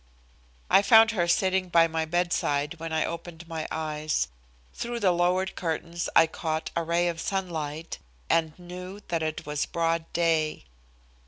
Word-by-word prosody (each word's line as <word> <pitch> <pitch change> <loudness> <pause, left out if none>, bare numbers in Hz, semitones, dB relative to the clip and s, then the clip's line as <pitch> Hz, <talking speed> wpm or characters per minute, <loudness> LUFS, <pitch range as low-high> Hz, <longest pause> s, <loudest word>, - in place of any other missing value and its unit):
I - - +6
found 225 +2 +7
her 175 -6 0
sitting 185 0 +2
by 165 -1 +5
my 160 0 -1
bedside 160 -2 0
when 165 0 -5
I 160 0 +1
opened 170 0 -7
my 160 -2 -4
eyes. 155 - -1 0.4
Through 235 0 -4
the 195 -4 +3
lowered 180 +2 +1
curtains 170 0 -3
I 165 - +8
caught 160 0 -3
a 170 - +1
ray 170 +1 +1
of 165 -1 -2
sunlight, 165 -5 -3 0.3
and 160 - +1
knew 180 +3 -8
that 170 -2 0
it 155 -1 -3
was 150 -1 -2
broad 165 -1 -1
day. 160 - +1
170 Hz, 155 wpm, -27 LUFS, 160-180 Hz, 0.4 s, I